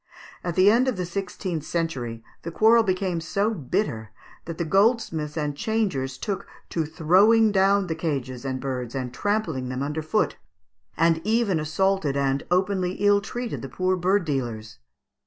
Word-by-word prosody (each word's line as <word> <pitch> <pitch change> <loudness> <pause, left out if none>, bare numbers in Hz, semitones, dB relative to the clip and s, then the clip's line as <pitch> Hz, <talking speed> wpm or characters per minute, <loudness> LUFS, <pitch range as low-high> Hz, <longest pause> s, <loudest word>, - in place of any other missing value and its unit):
At 175 -2 -3
the 190 +2 +6
end 245 +4 +3
of 255 -6 0
the 180 - -2
sixteenth 180 -2 -4
century 135 -10 -3 0.2
the 170 - -5
quarrel 220 +6 +5
became 185 -4 -1
so 200 +6 0
bitter 135 - -2 0.4
that 165 -1 -6
the 170 - -1
goldsmiths 190 -6 +1
and 150 -2 -2
changers 190 - -1
took 200 -2 -4 0.2
to 160 -3 -1
"throwing 200 +8 +4
down 195 0 +3
the 165 - -2
cages 135 -6 -3
and 130 -1 -3
birds 125 -2 -4
and 125 -2 -4
trampling 165 -7 -1
them 130 +1 -3
under 150 +2 -2
foot," 155 - 0 0.6
and 165 0 +3
even 215 -4 +1
assaulted 155 -1 0
and 135 0 0
openly 185 0 +1
ill 205 +1 +3
treated 240 +3 -5
the 135 - -7
poor 185 +7 0
bird 185 +1 +1
dealers. 120 - -4
170 Hz, 160 wpm, -25 LUFS, 140-200 Hz, 0.6 s, the